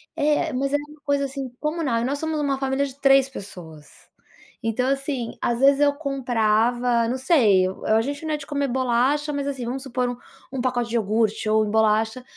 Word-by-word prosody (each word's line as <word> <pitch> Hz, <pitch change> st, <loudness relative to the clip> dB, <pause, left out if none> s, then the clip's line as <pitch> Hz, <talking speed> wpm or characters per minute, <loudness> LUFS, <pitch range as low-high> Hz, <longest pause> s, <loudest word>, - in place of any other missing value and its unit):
é, 295 Hz, 0 st, +1 dB
mas 275 Hz, +2 st, -1 dB
é -, -, +4 dB
uma 295 Hz, +1 st, -11 dB
coisa, 285 Hz, -1 st, +1 dB
assim, 270 Hz, -1 st, -5 dB
comunal, 300 Hz, -6 st, -1 dB
e -, -, -2 dB
nós 280 Hz, +2 st, -2 dB
somos 315 Hz, -1 st, -2 dB
uma 280 Hz, -2 st, 0 dB
família 270 Hz, +1 st, 0 dB
de 275 Hz, 0 st, -10 dB
3 275 Hz, -1 st, +4 dB
pessoas. 165 Hz, -, -10 dB, 0.8 s
Então, 225 Hz, +3 st, 0 dB
assim, 275 Hz, -3 st, -3 dB
às 240 Hz, 0 st, 0 dB
vezes 275 Hz, +1 st, +5 dB
eu 285 Hz, 0 st, +4 dB
comprava, 240 Hz, -3 st, +1 dB
não 255 Hz, -, -1 dB
sei, 225 Hz, -, +4 dB
eu 190 Hz, -, -7 dB
eh, -, -, 0 dB
a 220 Hz, -, +4 dB
gente 285 Hz, +5 st, -5 dB
não 310 Hz, -, -1 dB
é 300 Hz, -, 0 dB
de 285 Hz, -, -10 dB
comer 285 Hz, -2 st, -1 dB
bolacha, 260 Hz, +4 st, +1 dB
mas, 280 Hz, -1 st, -2 dB
assim, 265 Hz, -4 st, -4 dB
vamos 260 Hz, +2 st, -4 dB
supor 250 Hz, -2 st, -2 dB
um 245 Hz, -, -5 dB, 0.3 s
um 265 Hz, -, -3 dB
pacote 245 Hz, -2 st, -1 dB
de 235 Hz, -, -3 dB
iogurte 215 Hz, 0 st, 0 dB
ou 215 Hz, 0 st, +3 dB
bolacha, 220 Hz, +3 st, +1 dB
260 Hz, 210 wpm, -23 LUFS, 230-280 Hz, 0.8 s, vezes